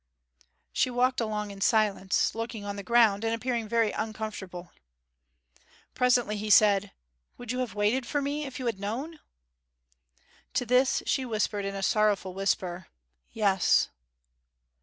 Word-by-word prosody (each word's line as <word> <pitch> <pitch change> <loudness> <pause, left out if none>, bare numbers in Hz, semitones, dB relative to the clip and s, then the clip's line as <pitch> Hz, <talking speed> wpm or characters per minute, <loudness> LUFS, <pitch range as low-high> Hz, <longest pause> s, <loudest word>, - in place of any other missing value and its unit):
She - - +2
walked 250 +1 +1
along 210 -2 -3
in 195 0 -11
silence, 205 -3 +2
looking 225 -2 -5
on 200 0 -4
the 200 - -5
ground, 220 0 +3
and 225 0 0
appearing 235 -1 -2
very 230 -2 +2
uncomfortable. 210 -5 -6 1.2
Presently 245 -4 +2
he 210 +1 -4
said, 205 -1 +5 0.5
'Would 245 -1 -6
you 250 - -2
have 240 -6 -3
waited 220 +5 +1
for 290 - 0
me 290 +2 -2
if 265 - -8
you 255 - -5
had 225 -5 -2
known?' 260 +11 -4 1.4
To 250 -1 +1
this 250 +2 +2
she 265 - 0
whispered 215 -4 -1
in 195 0 -4
a 195 - -4
sorrowful 205 -3 +1
whisper, 185 -2 -2 0.4
'Yes!' 195 -4 +2
215 Hz, 140 wpm, -28 LUFS, 200-245 Hz, 1.4 s, said